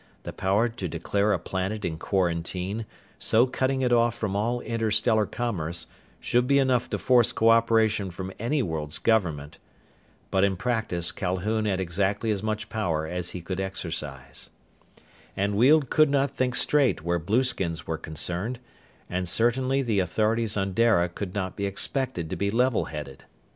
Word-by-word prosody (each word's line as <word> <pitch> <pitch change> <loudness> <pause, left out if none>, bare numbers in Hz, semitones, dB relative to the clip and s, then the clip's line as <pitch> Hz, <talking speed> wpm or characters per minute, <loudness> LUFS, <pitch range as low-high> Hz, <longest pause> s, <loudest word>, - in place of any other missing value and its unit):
The - - -6
power 100 +5 +1
to 115 -5 -5
declare 100 +6 0
a - - +2
planet 95 +3 -3
in 80 -2 -3
quarantine, 90 +4 -1 0.3
so 115 +3 +3
cutting 130 +1 -1
it 125 -1 +2
off 120 -1 +3
from 105 -4 -3
all 115 +4 0
interstellar 110 -1 +1
commerce, 85 -9 -3 0.3
should 120 +1 +1
be 140 - +4
enough 130 -3 +2
to - - -1
force 120 -2 +4
cooperation 115 -3 +3
from 95 +2 -7
any 130 +5 0
world's 80 -5 -3
government. 80 -10 0 0.7
But 95 - +2
in 100 -1 +2
practice 110 -6 0
Calhoun 100 +4 -1
had 95 -3 0
exactly 100 +5 0
as 100 -2 -1
much 110 0 -3
power 90 -8 -1
as 90 +2 -3
he 90 - -6
could 95 +2 -4
exercise. 80 -8 -5 0.9
And 100 +1 0
Weald 135 +5 +4
could 155 -2 +5
not 140 -1 +1
think 125 -1 0
straight 140 - +3
where 85 +1 0
blueskins 95 -4 0
were 80 -1 -3
concerned, 85 +9 -2 0.5
and 90 0 -2
certainly 130 +6 +2
the 110 -5 +1
authorities 110 +3 +1
on 95 -1 -1
Dara 105 -6 +3
could 90 +2 -6
not 95 -2 -3
be 100 -1 -2
expected 100 - -1
to - - -1
be 100 - -1
levelheaded. 100 - -1
105 Hz, 160 wpm, -26 LUFS, 90-115 Hz, 0.9 s, could